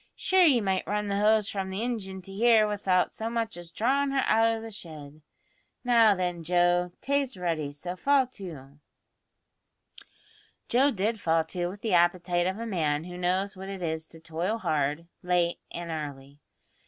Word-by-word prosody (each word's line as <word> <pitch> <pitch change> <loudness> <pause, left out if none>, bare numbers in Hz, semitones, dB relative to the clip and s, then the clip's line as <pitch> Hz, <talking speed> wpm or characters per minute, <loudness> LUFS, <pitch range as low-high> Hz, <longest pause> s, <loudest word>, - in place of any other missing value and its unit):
Shure 375 0 +2
ye 255 -6 +4
might 190 -2 -1
run 210 0 -1
the 200 0 0
hose 215 0 +3
from 195 -2 -3
the 190 +2 -3
ingin 195 -6 -4
to 195 - -10
here 220 0 +4
without 195 -3 +1
so 225 +1 -4
much 230 -1 -2
as 175 -1 -9
drawin' 275 +9 +1
her 270 -1 +1
out 225 +1 +4
o' 225 0 0
the 225 0 -8
shed. 155 -6 -9 0.6
Now, 230 -4 +5
then, 180 -2 -2
Joe, 175 +1 +2
tay's 275 -5 -1
ready, 165 -5 -2
so 175 +5 -6
fall 275 +7 +3
to." 155 - -10 1.9
Joe 265 +4 +4
did 220 -1 -1
fall 165 -3 +2
to 175 +2 -3
with 200 +3 -8
the 220 -4 -1
appetite 175 0 +2
of 190 +2 -2
a 230 - -5
man 155 -8 0
who 175 +1 -8
knows 185 +3 -1
what 190 +1 -8
it 195 -2 -6
is 160 -1 -3
to 165 - -14
toil 165 +7 -2
hard, 155 -4 -1 0.2
late 175 -1 +1
and 170 -1 -6
early. 145 -2 -7
185 Hz, 180 wpm, -28 LUFS, 170-220 Hz, 1.9 s, Now